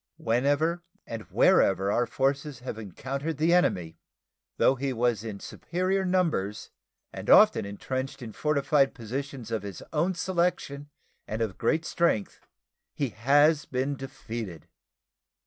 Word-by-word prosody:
Whenever 145 +9 +1 0.2
and 115 -1 -6
wherever 95 +1 +4
our 120 +3 +1
forces 135 0 -1
have 120 -3 -6
encountered 135 - -4
the 160 +3 +3
enemy, 90 - +1 0.6
though - - +5
he 135 +1 -2
was 120 -3 0
in 110 -3 -5
vastly - - -10
superior 185 +2 0
numbers 165 - 0 0.4
and - - -6
often - - +7
intrenched 130 +6 -4
in 110 -2 -7
fortified 145 -1 +2
positions 125 +1 -5
of 110 -2 -1
his 100 -3 -8
own 170 +5 +1
selection 170 -5 -1 0.4
and 110 - -3
of 110 -5 -2
great 160 +1 +1
strength, 160 - 0 0.5
he 140 -3 -1
has 145 +7 +3
been 130 +2 -1
defeated. 115 - -7
135 Hz, 130 wpm, -27 LUFS, 110-150 Hz, 0.6 s, often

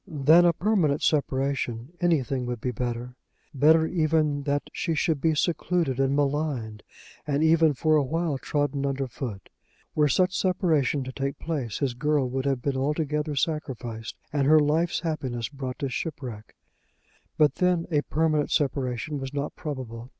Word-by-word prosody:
Than 155 +4 +5
a 170 - +5
permanent 170 -6 +1
separation 135 -4 0
anything 135 -7 +1
would 120 -1 -3
be 125 - -2
better; 120 +1 -4 0.4
better 155 +3 +5
even 155 -3 +1
that 145 0 0
she 165 -3 -1
should 155 -2 0
be 160 -1 +2
secluded 165 -4 0
and 135 +1 +2
maligned, 140 -7 -1 0.5
and 145 +1 +1
even, 160 -2 +4
for 155 +3 +2
a 150 - +4
while, 160 0 -1
trodden 145 -1 -1
under 135 -1 -1
foot. 115 -5 -6 0.5
Were 150 -1 +3
such 180 +6 +2
separation 160 -7 +1
to 130 - -6
take 135 +1 -3
place 140 -10 -3
his 135 -4 -1
girl 145 +2 +1
would 130 +1 -2
have 135 -3 0
been 140 -2 0
altogether 150 +1 -1
sacrificed, 125 -7 -3 0.2
and 140 -2 +1
her 155 +1 +7
life's 155 +3 +1
happiness 135 -8 -3
brought 135 -3 -6
to 140 - -2
shipwreck. 125 -6 -6 0.8
But 150 -1 +4
then 180 -2 +2
a 150 -2 +3
permanent 155 -1 0
separation 140 0 -1
was 135 +1 -6
not 140 +1 -3
probable. 125 -6 -6
145 Hz, 155 wpm, -26 LUFS, 130-155 Hz, 0.8 s, her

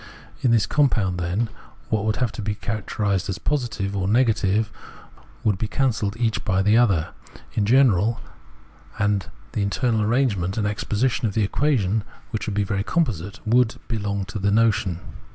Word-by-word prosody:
In 130 - +3
this 115 -2 +4
compound, 115 -11 +1
then, 90 +7 0 0.4
what 110 -1 0
would 110 0 +1
have 125 -4 0
to 115 - -6
be 105 0 -2
characterised 105 -2 -2
as 95 - -2
positive 120 -9 -2
or 95 -1 -1
negative, 110 -2 +2 0.4
and - - -23 0.2
would 105 -3 +1
be 110 - -1
cancelled 110 -4 0
each 115 -2 0
by 95 -2 +1
the 105 +2 +4
other 100 -9 +3 0.2
— - - -19
in 100 -2 0
general, 115 -4 +4 0.8
the 105 0 -2
internal 110 +3 +1
arrangement 105 -5 +1
and 105 - 0
exposition 110 +4 0
of 100 - -4
the 110 - +2
equation, 110 -3 +1 0.3
which 110 -3 -3
would 105 - -2
be 105 - +2
very 100 0 -1
composite, 105 - -1
— - - -30
would 120 +1 +3
be 115 - -2
long 100 -1 -2
to 105 +1 -6
the 100 +1 +1
notion. 105 -5 +2
105 Hz, 175 wpm, -23 LUFS, 100-115 Hz, 0.8 s, this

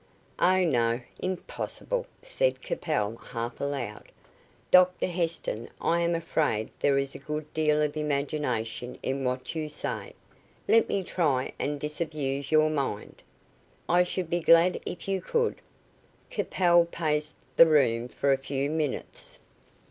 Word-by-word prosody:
"Oh, 185 +1 +4
no; 120 -6 +2 0.2
impossible," 190 - -3 0.2
said - - +1
Capel, 110 - -2
half 120 0 -6
aloud. 135 -7 -3 0.7
"Dr 180 0 +6
Heston, 165 -10 -2
I 170 - +2
am 170 0 +1
afraid 150 -9 0
there 140 -1 +3
is 140 0 -1
a - - -8
good 150 +2 -5
deal 150 -1 +2
of 150 0 -1
imagination 140 -5 -2
in 135 +1 -1
what 130 0 -2
you 155 -2 -3
say. 150 - -4 0.5
Let 230 - +4
me 195 - 0
try 150 -8 0
and 145 0 -2
disabuse 150 -2 -3
your 155 0 +5
mind." 135 -8 -3 0.7
"I 175 +1 +4
should 180 -1 -2
be 175 - +2
glad 170 +2 +5
if 175 - -6
you 195 -1 0
could." 465 - 0 0.7
Capel 175 -2 +3
paced 155 -3 -1 0.2
the 165 - +9
room 125 -6 +3
for 140 +2 +1
a 135 - 0
few 135 +1 -2
minutes. 155 -4 -4
150 Hz, 135 wpm, -28 LUFS, 135-170 Hz, 0.7 s, the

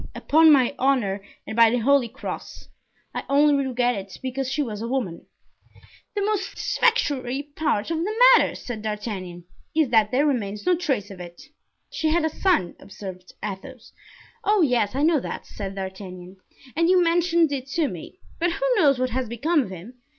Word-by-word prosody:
Upon 320 +1 +5
my 265 -3 +4
honor 245 -8 +1 0.2
and 220 - -6
by 230 -1 +6
the 245 - +1
holy 265 +1 +3
cross; - - -8 0.4
I - - -4
only 290 +1 +4
regret 245 -2 0
it 195 -3 -7
because 260 0 -3
she 295 +2 0
was 215 -5 -6
a 230 - -3
woman." 235 -10 -3 0.9
"The 405 - 0
most 410 -2 -2
satisfactory 280 - 0
part 310 -5 -1
of 325 - -1
the 410 +6 -2 0.2
matter," - - +3
said 235 -4 -6
D'Artagnan, 205 -5 -5 0.3
"is 315 -5 +3
that 220 -3 +4
there 270 +6 +2
remains 210 -8 -2
no 360 0 +4
trace 260 - -2
of 190 - -10
it." 175 -1 -10 0.5
"She 315 - -1
had 320 0 +2
a - - +1
son," 325 - +1
observed 185 -2 -10
Athos. 220 +5 -8 0.5
"Oh! 415 -3 +3
yes, 245 -5 +1
I 280 - 0
know 320 -1 +4
that," - - -6
said 195 -2 -7
D'Artagnan, 190 -1 -8 0.4
"and 335 +2 +2
you 370 0 +5
mentioned 335 -1 +2
it 270 -2 -4
to 325 -3 +1
me; 185 - -9 0.2
but 340 0 +1
who - - -2
knows 285 -8 +4
what 255 0 -1
has 250 -1 -2
become 295 +8 +1
of 240 - -5
him? 190 +6 -9
255 Hz, 180 wpm, -24 LUFS, 205-315 Hz, 0.9 s, by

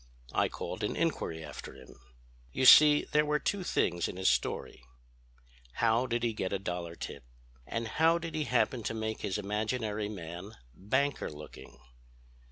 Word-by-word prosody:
I - - +2
called - - -6
an - - -1
inquiry 80 -1 -2
after 75 - -9
him... - - -14 0.6
You 130 - 0
see 150 +2 +9
there 150 - +4
were 150 0 +1
two 195 +5 -2
things 85 - 0
in - - -7
his 95 - +3
story: - - -2 0.9
How 115 +2 +2
did 120 -1 -1
he 115 -1 +1
get 95 -3 -3
a 100 - 0
dollar 90 -3 -5
tip, 70 - -7 0.4
and 115 0 -3
how 165 +6 +3
did 165 -1 -6
he 155 -1 -1
happen 125 0 +1
to 115 - -3
make 110 0 -3
his 95 - -2
imaginary 105 +1 -2
man 90 +1 -7 0.2
banker 130 - -1
looking? 75 0 -11
110 Hz, 165 wpm, -31 LUFS, 90-130 Hz, 0.9 s, see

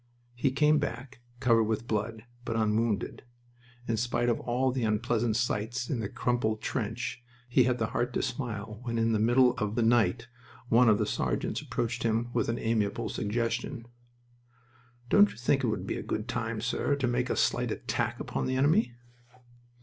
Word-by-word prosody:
He 120 +3 +1
came 150 +3 +3
back, 130 -3 -5 0.2
covered 115 -3 +4
with 110 +1 -2
blood, 110 +1 -2 0.2
but 115 - -3
unwounded. 110 -1 0 0.7
In 115 - 0
spite 120 +1 0
of 115 - +1
all 130 +2 0
the 125 -1 -2
unpleasant 110 +1 +1
sights 120 +2 -1
in 125 -5 -1
a 100 - -3
crumpled 120 -3 0
trench, 115 +1 -3 0.3
he 125 0 +4
had 125 -1 +1
the 115 - 0
heart 120 +1 0
to - - 0
smile 110 -5 -4
when 120 -2 -3
in 115 0 +2
the 110 - +2
middle 125 +3 +4
of 105 0 -1
the 120 - +2
night 115 -3 +2 0.4
one 120 0 +6
of 105 - +5
the - - 0
sergeants - - -1
approached 115 0 -3
him 115 +1 0
with - - 0
an 115 - -1
amiable 110 -3 -1
suggestion. 115 +3 -2 1.2
"Don't 105 -2 +6
you 100 - -12
think 135 +3 +1
it - - +2
would 110 - -2
be - - -3
a - - -4
good 105 +2 -3
time, 115 -2 -2
sir, 125 +4 0
to 140 -2 -1
make 125 +1 0
a - - 0
slight - - +1
attack - - -2
upon - - -3
the 130 - 0
enemy?" 145 - +2
115 Hz, 180 wpm, -29 LUFS, 110-125 Hz, 1.2 s, one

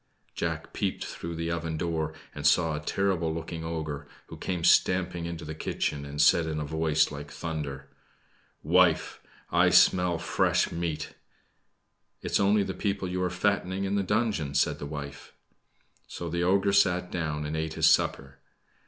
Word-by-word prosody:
Jack - - -4
peeped - - -2
through 85 0 -6
the 85 +1 -2
oven 85 -1 -3
door, 80 -1 -1 0.2
and 75 0 0
saw 80 0 +3
a - - -3
terrible 85 0 0
looking 80 0 -5
ogre, 80 -3 -4 0.2
who - - -8
came 90 -3 -3
stamping 90 -1 +3
into 85 -1 -6
the 80 - -5
kitchen, 75 -2 -3
and 70 +1 -7
said 80 +2 +5
in 80 -1 -2
a 75 - -3
voice 80 0 +1
like 75 0 -7
thunder 75 -3 -5 0.8
"Wife, - - +3 0.3
I 90 +1 +4
smell 90 -1 +4
fresh - - +1
meat!" 85 -2 -3 1.1
"It - - -4
is - - +3
only 100 +1 +3
the 95 - -4
people 100 0 -2
you 90 0 -2
are 90 - +1
fattening 95 +1 0
in 100 0 -1
the 100 - +2
dungeon," 100 -8 -1
said 70 - +2
the 70 - -5
wife. 70 -1 -8 0.7
So 85 - -6
the 85 0 -1
ogre 95 +2 +2
sat 90 -2 +3
down 75 -3 -2
and 75 +1 -3
ate 80 0 -3
his - - +4
supper. 70 0 +1
85 Hz, 170 wpm, -28 LUFS, 75-90 Hz, 1.1 s, said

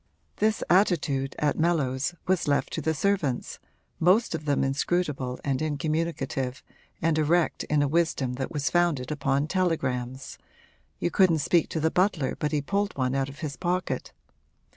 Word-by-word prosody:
This 215 0 +1
attitude, 150 -8 +2
at 150 0 0
Mellows, 150 -3 +1
was 185 -3 +1
left 145 -1 +1
to 160 - -2
the 160 +2 0
servants, 170 -8 -1 0.4
most 185 +7 +3
of 155 -2 -4
them 145 -2 +1
inscrutable 135 -2 -1
and 135 -2 0
incommunicative 150 -4 -2 0.4
and 160 -1 +2
erect 165 +2 +1
in 150 -1 +2
a - - +2
wisdom 145 -5 0
that 130 +1 -4
was 145 -4 -1
founded 165 -7 +1
upon 140 -1 0
telegrams 135 -8 -2 0.6
you 175 - -1
couldn't 185 -4 +4
speak 165 +3 +2
to 160 - -2
the 160 +1 +1
butler 180 -7 +1
but 150 - -1
he 150 -2 0
pulled 200 +3 -1
one 130 -1 0
out 135 0 0
of 140 - -11
his 145 -3 -4
pocket. 180 0 -2
150 Hz, 160 wpm, -27 LUFS, 135-175 Hz, 0.6 s, couldn't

